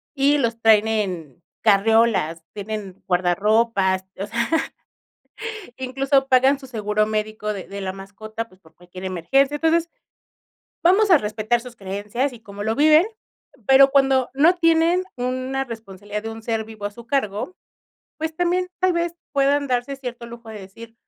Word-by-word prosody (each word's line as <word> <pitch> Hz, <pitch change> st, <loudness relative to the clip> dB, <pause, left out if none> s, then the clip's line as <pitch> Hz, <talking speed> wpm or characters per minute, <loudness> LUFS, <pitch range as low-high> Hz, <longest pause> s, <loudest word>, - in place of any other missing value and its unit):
y 280 Hz, +2 st, +3 dB
los 230 Hz, -2 st, -1 dB
traen 220 Hz, -1 st, +5 dB
en 180 Hz, -, -3 dB, 0.2 s
carreolas, 205 Hz, -6 st, +3 dB
tienen 205 Hz, -2 st, -6 dB
guardarropas, 190 Hz, +1 st, +2 dB
o 200 Hz, -, -2 dB
sea, 235 Hz, +2 st, -2 dB, 1.3 s
incluso 270 Hz, +1 st, +1 dB
pagan 265 Hz, +1 st, +4 dB
su 270 Hz, -, -11 dB
seguro 215 Hz, -3 st, 0 dB
médico 215 Hz, 0 st, -2 dB
de 195 Hz, -3 st, -7 dB
de 200 Hz, 0 st, -7 dB
la 190 Hz, -1 st, -3 dB
mascota, 215 Hz, +4 st, -7 dB
pues, 185 Hz, +1 st, -23 dB
por 160 Hz, -3 st, -22 dB
cualquier 180 Hz, +2 st, -11 dB
emergencia. 270 Hz, -, +1 dB
Entonces, 325 Hz, +2 st, +2 dB, 0.9 s
vamos 385 Hz, +4 st, +4 dB
a 335 Hz, -, +8 dB
respetar 215 Hz, +2 st, -1 dB
sus 245 Hz, -1 st, -11 dB
creencias 205 Hz, +7 st, -3 dB
y 235 Hz, -, -12 dB
cómo 205 Hz, -1 st, -8 dB
lo 220 Hz, 0 st, 0 dB
viven, 310 Hz, -, +5 dB, 0.6 s
pero 270 Hz, 0 st, +7 dB
cuando 270 Hz, -2 st, +3 dB
no 320 Hz, +6 st, +5 dB
tienen 335 Hz, +2 st, +3 dB
una 255 Hz, +2 st, -2 dB
responsabilidad 210 Hz, -3 st, -7 dB
de 225 Hz, -, -5 dB
un 225 Hz, 0 st, -9 dB
ser 220 Hz, -1 st, -2 dB
vivo 215 Hz, -2 st, -7 dB
a -, -, -4 dB
su 235 Hz, +2 st, -13 dB
cargo, 225 Hz, -, -2 dB, 0.6 s
pues 320 Hz, 0 st, -3 dB
también 360 Hz, +1 st, +1 dB
tal 370 Hz, -1 st, +3 dB
vez 340 Hz, 0 st, -1 dB, 0.2 s
puedan 280 Hz, 0 st, +2 dB
darse 250 Hz, +2 st, -1 dB
cierto 245 Hz, -3 st, -7 dB
lujo 235 Hz, -1 st, -11 dB
de 215 Hz, -2 st, -8 dB
decir 225 Hz, +4 st, -12 dB
230 Hz, 155 wpm, -22 LUFS, 205-275 Hz, 1.3 s, a